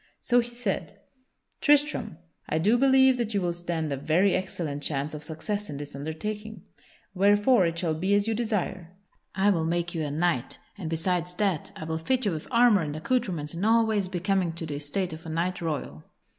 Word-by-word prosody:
So 245 Hz, 0 st, +3 dB
he 240 Hz, 0 st, -1 dB
said: 235 Hz, -4 st, -3 dB, 0.6 s
"Tristram, 290 Hz, -, +2 dB, 0.3 s
I 155 Hz, -, +1 dB
do 205 Hz, +9 st, +3 dB
believe 265 Hz, 0 st, +5 dB
that 230 Hz, -3 st, -2 dB
you 200 Hz, -, +2 dB
will 175 Hz, -1 st, 0 dB
stand 170 Hz, -3 st, -3 dB
a 140 Hz, -, -1 dB
very 165 Hz, +8 st, +2 dB
excellent 165 Hz, -6 st, -3 dB
chance 145 Hz, 0 st, -2 dB
of 150 Hz, 0 st, -7 dB
success 200 Hz, +7 st, -4 dB
in 145 Hz, -, -5 dB
this 145 Hz, 0 st, -7 dB
undertaking, 210 Hz, +9 st, -5 dB, 0.5 s
wherefore 205 Hz, +2 st, +4 dB
it 165 Hz, 0 st, -3 dB
shall 170 Hz, -2 st, 0 dB
be 190 Hz, +6 st, +1 dB
as 205 Hz, +1 st, +2 dB
you 225 Hz, -, +1 dB
desire; 190 Hz, -6 st, -3 dB, 0.4 s
I 195 Hz, +2 st, +4 dB
will 165 Hz, -4 st, +1 dB
make 175 Hz, +1 st, -1 dB
you 165 Hz, -, -2 dB
a 150 Hz, -, -2 dB
knight, 155 Hz, -3 st, 0 dB, 0.2 s
and 185 Hz, -6 st, -5 dB
besides 175 Hz, +2 st, -1 dB
that 190 Hz, -6 st, -1 dB
I -, -, -7 dB
will 160 Hz, 0 st, -3 dB
fit 255 Hz, +9 st, 0 dB
you 200 Hz, -, +2 dB
with 155 Hz, -2 st, -5 dB
armor 235 Hz, -5 st, +5 dB
and 150 Hz, -2 st, -3 dB
accoutrements 175 Hz, -5 st, -1 dB
in 170 Hz, +3 st, -4 dB
all 225 Hz, +1 st, +4 dB
ways 210 Hz, -3 st, 0 dB
becoming 185 Hz, -1 st, 0 dB
to 170 Hz, 0 st, -6 dB
the 145 Hz, -2 st, -4 dB
estate 165 Hz, +5 st, -2 dB
of 160 Hz, +1 st, -9 dB
a -, -, -5 dB
knight 175 Hz, +3 st, -1 dB
royal. 145 Hz, -, -4 dB
180 Hz, 200 wpm, -27 LUFS, 160-210 Hz, 0.6 s, believe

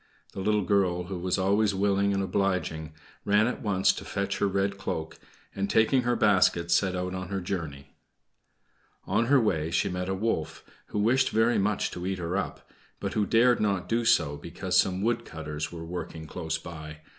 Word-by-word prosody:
The -, -, -6 dB
little 105 Hz, +1 st, +1 dB
girl, 90 Hz, -2 st, +1 dB
who 90 Hz, 0 st, -5 dB
was 90 Hz, +1 st, 0 dB
always 100 Hz, +2 st, +2 dB
willing 100 Hz, 0 st, +2 dB
and 100 Hz, 0 st, 0 dB
obliging, 90 Hz, -6 st, -1 dB, 0.3 s
ran 105 Hz, +2 st, +3 dB
at 125 Hz, -, -2 dB
once 95 Hz, -3 st, +2 dB
to -, -, -7 dB
fetch 100 Hz, 0 st, -3 dB
her 100 Hz, -, +2 dB
red 100 Hz, 0 st, -1 dB
cloak, 80 Hz, -4 st, -4 dB, 0.3 s
and, 100 Hz, 0 st, -2 dB
taking 120 Hz, +4 st, +3 dB
her 120 Hz, 0 st, +1 dB
basket, 95 Hz, -6 st, +3 dB
set 95 Hz, +1 st, +2 dB
out 90 Hz, 0 st, -3 dB
on 90 Hz, -1 st, -4 dB
her 95 Hz, -, -2 dB
journey. 80 Hz, -7 st, -5 dB, 1.1 s
On 110 Hz, +5 st, +1 dB
her 140 Hz, +1 st, +5 dB
way 80 Hz, -9 st, 0 dB
she 85 Hz, -, +1 dB
met 90 Hz, 0 st, -3 dB
a 95 Hz, -, 0 dB
wolf, 95 Hz, -6 st, -2 dB, 0.2 s
who -, -, -5 dB
wished 120 Hz, +6 st, +3 dB
very 115 Hz, 0 st, +2 dB
much 100 Hz, +1 st, 0 dB
to 90 Hz, +1 st, -5 dB
eat 95 Hz, 0 st, -1 dB
her 90 Hz, +1 st, -3 dB
up; 100 Hz, -, -4 dB, 0.3 s
but -, -, -3 dB
who 105 Hz, -2 st, +1 dB
dared 120 Hz, +2 st, +4 dB
not 100 Hz, -4 st, 0 dB
do 115 Hz, +1 st, +1 dB
so 80 Hz, -10 st, +3 dB
because 90 Hz, +4 st, -4 dB
some 95 Hz, +1 st, +3 dB
wood 115 Hz, +2 st, +1 dB
cutters 75 Hz, -1 st, -5 dB
were 85 Hz, -1 st, -7 dB
working 85 Hz, -2 st, -6 dB
close 80 Hz, +1 st, -3 dB
by. 80 Hz, -2 st, -9 dB
95 Hz, 190 wpm, -27 LUFS, 85-105 Hz, 1.1 s, her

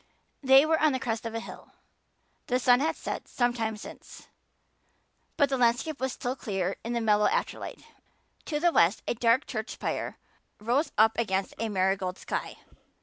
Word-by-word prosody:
They 270 Hz, +1 st, +7 dB
were 320 Hz, 0 st, +2 dB
on 310 Hz, -2 st, +4 dB
the 260 Hz, -, -1 dB
crest 225 Hz, -2 st, -3 dB
of 225 Hz, -, -6 dB
a -, -, -1 dB
hill. -, -, -11 dB, 0.7 s
The 250 Hz, -, +2 dB
sun 245 Hz, -1 st, +4 dB
had 315 Hz, +3 st, 0 dB
set -, -, -5 dB
some 245 Hz, -1 st, +1 dB
time 220 Hz, -2 st, -2 dB
since, -, -, -12 dB, 1.1 s
but 285 Hz, -, +4 dB
the 270 Hz, -2 st, -1 dB
landscape 245 Hz, +5 st, +1 dB
was 265 Hz, 0 st, 0 dB
still 245 Hz, +1 st, -3 dB
clear 195 Hz, -6 st, -2 dB
in 235 Hz, -, -3 dB
the 235 Hz, -, 0 dB
mellow 210 Hz, -1 st, +3 dB
afterlight. 480 Hz, +3 st, -3 dB, 0.6 s
To 295 Hz, -2 st, -2 dB
the 345 Hz, +2 st, +3 dB
west 170 Hz, -, +3 dB
a -, -, +1 dB
dark 235 Hz, +3 st, +2 dB
church 220 Hz, +1 st, -4 dB
spire -, -, -4 dB, 0.4 s
rose 245 Hz, +9 st, 0 dB
up 220 Hz, +1 st, +5 dB
against 195 Hz, -4 st, -1 dB
a 225 Hz, 0 st, -1 dB
marigold 190 Hz, -1 st, 0 dB
sky. -, -, -4 dB
235 Hz, 175 wpm, -28 LUFS, 215-265 Hz, 1.1 s, They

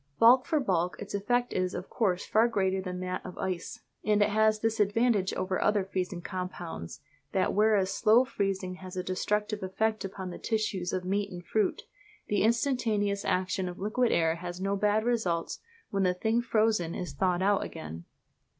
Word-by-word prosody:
Bulk 250 Hz, +3 st, +6 dB
for 315 Hz, -3 st, +2 dB
bulk 180 Hz, -8 st, 0 dB
its 205 Hz, -, -7 dB
effect 245 Hz, +5 st, 0 dB
is 185 Hz, 0 st, -1 dB
of 180 Hz, -, -5 dB
course 190 Hz, -6 st, 0 dB
far 225 Hz, +2 st, +4 dB
greater 190 Hz, -4 st, 0 dB
than 180 Hz, -1 st, -5 dB
that 185 Hz, 0 st, -3 dB
of 180 Hz, -, -9 dB
ice; 185 Hz, -3 st, -4 dB, 0.2 s
and 210 Hz, 0 st, +3 dB
it 205 Hz, -, +1 dB
has 215 Hz, 0 st, +3 dB
this 225 Hz, -1 st, 0 dB
advantage 210 Hz, -1 st, +2 dB
over 185 Hz, 0 st, -1 dB
other 210 Hz, -1 st, +2 dB
freezing 185 Hz, -2 st, -3 dB
compounds, 180 Hz, -, -6 dB, 0.3 s
that 190 Hz, -, +1 dB
whereas 205 Hz, -2 st, +3 dB
slow 230 Hz, +4 st, +5 dB
freezing 195 Hz, -6 st, -2 dB
has 185 Hz, 0 st, -9 dB
a 180 Hz, -, -1 dB
destructive 210 Hz, +3 st, -1 dB
effect 215 Hz, +4 st, -1 dB
upon 190 Hz, -1 st, -5 dB
the -, -, -8 dB
tissues 210 Hz, -5 st, -1 dB
of 185 Hz, -1 st, -2 dB
meat 200 Hz, +2 st, 0 dB
and 175 Hz, -1 st, -8 dB
fruit, 215 Hz, +4 st, 0 dB, 0.5 s
the 205 Hz, -, +2 dB
instantaneous 220 Hz, -4 st, +1 dB
action 185 Hz, 0 st, 0 dB
of 175 Hz, -, -8 dB
liquid 220 Hz, +5 st, +1 dB
air 165 Hz, 0 st, +2 dB
has 175 Hz, +1 st, -6 dB
no 195 Hz, +1 st, 0 dB
bad 210 Hz, +2 st, +2 dB
results 220 Hz, -9 st, -1 dB, 0.3 s
when 195 Hz, -, 0 dB
the 180 Hz, -1 st, +2 dB
thing 225 Hz, +5 st, +1 dB
frozen 215 Hz, -7 st, +1 dB
is 180 Hz, -6 st, -5 dB
thawed 180 Hz, +3 st, +1 dB
out 200 Hz, 0 st, +3 dB
again. 80 Hz, +2 st, -8 dB
195 Hz, 180 wpm, -29 LUFS, 185-215 Hz, 0.5 s, Bulk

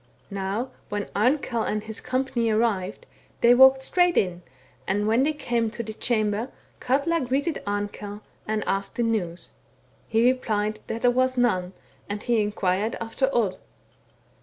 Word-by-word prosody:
Now 200 Hz, +6 st, -2 dB, 0.2 s
when 205 Hz, -1 st, -3 dB
Amkell 240 Hz, +1 st, +1 dB
and 210 Hz, -1 st, -1 dB
his 220 Hz, 0 st, -6 dB
company 255 Hz, -2 st, 0 dB
arrived, 215 Hz, -, 0 dB, 0.4 s
they 235 Hz, +1 st, +7 dB
walked 265 Hz, +1 st, +7 dB
straight 355 Hz, +4 st, +2 dB
in, 180 Hz, -2 st, +1 dB, 0.5 s
and 205 Hz, +2 st, 0 dB
when 225 Hz, +3 st, +3 dB
they 295 Hz, +3 st, +3 dB
came 240 Hz, -6 st, -1 dB
into 235 Hz, +1 st, -4 dB
the 220 Hz, 0 st, -6 dB
chamber, 215 Hz, +1 st, 0 dB, 0.3 s
Katla 285 Hz, +6 st, +1 dB
greeted 275 Hz, +5 st, -1 dB
Amkell, 205 Hz, 0 st, -4 dB, 0.3 s
and 215 Hz, -1 st, -1 dB
asked 195 Hz, 0 st, -2 dB
the 240 Hz, -, 0 dB
news. 190 Hz, -7 st, -2 dB, 0.6 s
He 225 Hz, +1 st, +2 dB
replied 215 Hz, -4 st, +1 dB
that 225 Hz, -, -4 dB
there 245 Hz, -, +5 dB
was 255 Hz, +1 st, +1 dB
none, 185 Hz, -7 st, +1 dB, 0.4 s
and 205 Hz, +1 st, -4 dB
he 235 Hz, -2 st, +2 dB
inquired 205 Hz, +1 st, 0 dB
after 230 Hz, +4 st, -1 dB
Odd. 210 Hz, -7 st, 0 dB
225 Hz, 150 wpm, -25 LUFS, 205-255 Hz, 0.6 s, they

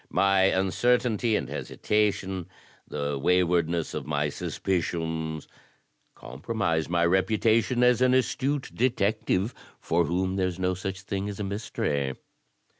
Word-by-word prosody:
My 95 Hz, -1 st, +3 dB
uncertainty 110 Hz, +4 st, +2 dB
and -, -, -1 dB
hesitation, 95 Hz, -4 st, -1 dB, 0.4 s
the 70 Hz, -1 st, -3 dB
wa3rwardness 85 Hz, 0 st, +1 dB
of -, -, -5 dB
my 75 Hz, 0 st, 0 dB
suspicions, 80 Hz, -2 st, -2 dB, 0.7 s
compromise 80 Hz, -, -2 dB
my 85 Hz, -1 st, +2 dB
reputation 110 Hz, +6 st, +2 dB
as 125 Hz, 0 st, +4 dB
an 130 Hz, 0 st, +4 dB
astute 135 Hz, +2 st, 0 dB
detective, 110 Hz, -3 st, 0 dB, 0.3 s
for 85 Hz, +1 st, +1 dB
whom 95 Hz, +4 st, -1 dB
there's 95 Hz, -2 st, 0 dB
no 95 Hz, 0 st, 0 dB
such 95 Hz, +1 st, -5 dB
thing 100 Hz, +1 st, -3 dB
as 100 Hz, -, -7 dB
a -, -, -2 dB
mystery." 75 Hz, -, -2 dB
95 Hz, 115 wpm, -27 LUFS, 85-110 Hz, 0.7 s, as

